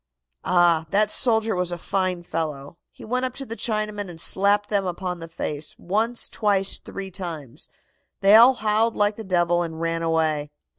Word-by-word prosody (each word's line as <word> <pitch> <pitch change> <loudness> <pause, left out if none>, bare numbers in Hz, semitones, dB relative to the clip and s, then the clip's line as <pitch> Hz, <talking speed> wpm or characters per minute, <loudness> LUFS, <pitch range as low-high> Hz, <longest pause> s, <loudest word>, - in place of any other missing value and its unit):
"Ah, 170 -3 +3
that 210 +3 +2
soldier 225 -4 +2
was 180 -1 0
a 175 - -3
fine 185 0 -2
fellow. 155 -2 -5
He - - -13
went 250 +3 -1
up 255 -1 -2
to 275 - -7
the 230 - -6
Chinamen 215 -3 -3
and 165 -2 -10
slapped 205 +4 +2
them 200 -2 +1
upon 180 -1 -4
the 165 - -8
face, 150 -2 -4
once, 220 +6 -1
twice, 200 -3 +1
three 195 -1 -8
times. 165 - -7 0.5
They 195 +1 +5
all 240 +4 +8
howled 220 +1 +1
like 205 0 +1
the 220 - -7
devil 175 -2 +1
and 160 -2 -5
ran 165 0 -1
away. 160 -3 0
190 Hz, 180 wpm, -23 LUFS, 165-215 Hz, 0.5 s, all